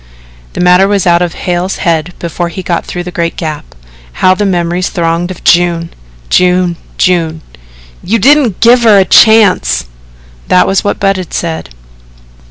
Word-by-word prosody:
The -, -, -4 dB
matter 180 Hz, +2 st, +4 dB
was 200 Hz, -2 st, 0 dB
out 170 Hz, -1 st, +3 dB
of 175 Hz, -2 st, -2 dB
Hale's 180 Hz, +1 st, -3 dB
head 170 Hz, -1 st, -2 dB
before 170 Hz, +1 st, -4 dB
he 185 Hz, +3 st, -7 dB
got 170 Hz, -1 st, -3 dB
through 175 Hz, -, -5 dB
the 180 Hz, -, -7 dB
great 170 Hz, -1 st, -3 dB
Gap. 155 Hz, -, -6 dB, 0.4 s
How 185 Hz, -, +2 dB
the 205 Hz, +2 st, -1 dB
memories 175 Hz, 0 st, -1 dB
thronged 170 Hz, 0 st, -2 dB
of 185 Hz, -, -9 dB
June 170 Hz, -1 st, +1 dB, 0.4 s
June 180 Hz, -, +1 dB, 0.2 s
June! 165 Hz, -3 st, 0 dB, 0.6 s
"YOU 225 Hz, +5 st, 0 dB
DIDN'T 260 Hz, -3 st, +2 dB
GIVE 240 Hz, +2 st, +5 dB
HER 220 Hz, -3 st, +5 dB
A 190 Hz, -, +3 dB
CHANCE." 200 Hz, -, +3 dB, 0.6 s
That 180 Hz, -, +3 dB
was 195 Hz, -, 0 dB
what 205 Hz, -, -2 dB
Budd 195 Hz, -3 st, -1 dB
said. 165 Hz, -, -4 dB
180 Hz, 160 wpm, -10 LUFS, 170-195 Hz, 0.6 s, GIVE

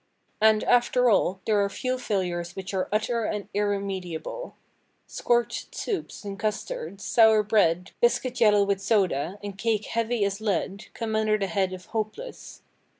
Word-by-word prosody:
And, 215 Hz, -1 st, +5 dB
after 245 Hz, 0 st, +3 dB
all, 190 Hz, -1 st, +2 dB
there 210 Hz, -2 st, +3 dB
are 200 Hz, -, 0 dB
few 255 Hz, +5 st, -2 dB
failures 180 Hz, -6 st, -2 dB
which 190 Hz, +1 st, -6 dB
are 190 Hz, -1 st, -1 dB
utter 225 Hz, +2 st, 0 dB
and 210 Hz, -1 st, -3 dB
irremediable. 200 Hz, -, -3 dB, 0.5 s
Scorched 240 Hz, 0 st, -1 dB
soups 385 Hz, -, -4 dB
and 200 Hz, 0 st, -6 dB
custards, 215 Hz, -, -4 dB
sour 220 Hz, -2 st, +5 dB
bread, 185 Hz, -4 st, +2 dB
biscuit 245 Hz, +1 st, +1 dB
yellow 210 Hz, -2 st, +6 dB
with 200 Hz, -1 st, 0 dB
soda, 190 Hz, -5 st, +1 dB
and 200 Hz, -1 st, -5 dB
cake 220 Hz, -1 st, 0 dB
heavy 230 Hz, -1 st, 0 dB
as 200 Hz, +1 st, -3 dB
lead, 200 Hz, -1 st, -2 dB
come 220 Hz, -1 st, -3 dB
under 215 Hz, -1 st, +2 dB
the 200 Hz, -, -1 dB
head 190 Hz, 0 st, 0 dB
of 185 Hz, -1 st, -8 dB
"hopeless." 230 Hz, -, -6 dB
210 Hz, 150 wpm, -26 LUFS, 195-230 Hz, 0.5 s, yellow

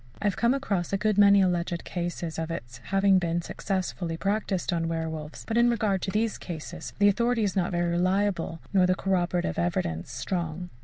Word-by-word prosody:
I 210 Hz, -, -4 dB
have 205 Hz, -, +2 dB
come 235 Hz, +3 st, +2 dB
across 200 Hz, -11 st, -1 dB
a 195 Hz, -, +2 dB
good 210 Hz, 0 st, +1 dB
many 200 Hz, -1 st, +7 dB
alleged 175 Hz, -1 st, 0 dB
cases 175 Hz, -2 st, -4 dB
of 160 Hz, 0 st, -3 dB
its 125 Hz, -7 st, -6 dB
having 195 Hz, -1 st, +4 dB
been 170 Hz, -1 st, -1 dB
successfully 180 Hz, -4 st, -3 dB
practised 195 Hz, -1 st, -1 dB
on 165 Hz, -1 st, 0 dB
werwolves, 160 Hz, -2 st, -4 dB
but 225 Hz, +1 st, +1 dB
in 240 Hz, 0 st, +5 dB
regard 210 Hz, -5 st, +1 dB
to -, -, -2 dB
these 215 Hz, +2 st, 0 dB
cases, 170 Hz, 0 st, -7 dB
the 205 Hz, -, +5 dB
authority 235 Hz, +3 st, +2 dB
is 200 Hz, -3 st, 0 dB
not 185 Hz, -1 st, +1 dB
very 175 Hz, -1 st, 0 dB
reliable, 185 Hz, -1 st, 0 dB
nor 185 Hz, -2 st, +5 dB
the 185 Hz, -, +3 dB
corroborative 180 Hz, -, 0 dB
evidence 85 Hz, +2 st, -1 dB
strong. 170 Hz, +6 st, -3 dB
180 Hz, 190 wpm, -27 LUFS, 165-200 Hz, -, many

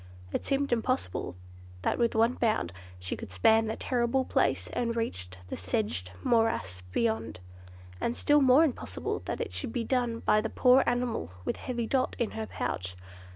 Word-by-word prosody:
It -, -, -3 dB
seemed 275 Hz, -2 st, +1 dB
impossible 240 Hz, -, -1 dB, 0.5 s
that -, -, 0 dB
with 235 Hz, -1 st, +2 dB
one 230 Hz, +2 st, +4 dB
bound 215 Hz, -, 0 dB, 0.2 s
she 90 Hz, 0 st, -4 dB
could 95 Hz, -, -9 dB
span 220 Hz, -, +4 dB
that 220 Hz, -, -4 dB
terrible 250 Hz, +1 st, +1 dB
place -, -, +1 dB
and 235 Hz, -1 st, -1 dB
reach 90 Hz, -, -2 dB, 0.2 s
the -, -, -3 dB
sedged 90 Hz, -1 st, -2 dB
morass 225 Hz, -, +1 dB
beyond; 110 Hz, -1 st, -1 dB, 0.6 s
and 235 Hz, -, -1 dB
still 295 Hz, 0 st, +4 dB
more 265 Hz, +3 st, +7 dB
impossible 120 Hz, -, -2 dB
that -, -, -3 dB
it -, -, -3 dB
should 90 Hz, +4 st, -3 dB
be 230 Hz, -, -1 dB
done 240 Hz, -2 st, 0 dB
by 215 Hz, -, +3 dB
the 225 Hz, -, -3 dB
poor 255 Hz, +3 st, +5 dB
animal 240 Hz, -, -1 dB
with -, -, -1 dB
heavy 240 Hz, -2 st, -3 dB
Dot 255 Hz, +3 st, 0 dB
in 235 Hz, -, -1 dB
her 220 Hz, -1 st, -4 dB
pouch. 90 Hz, 0 st, -3 dB
225 Hz, 170 wpm, -29 LUFS, -, 0.6 s, more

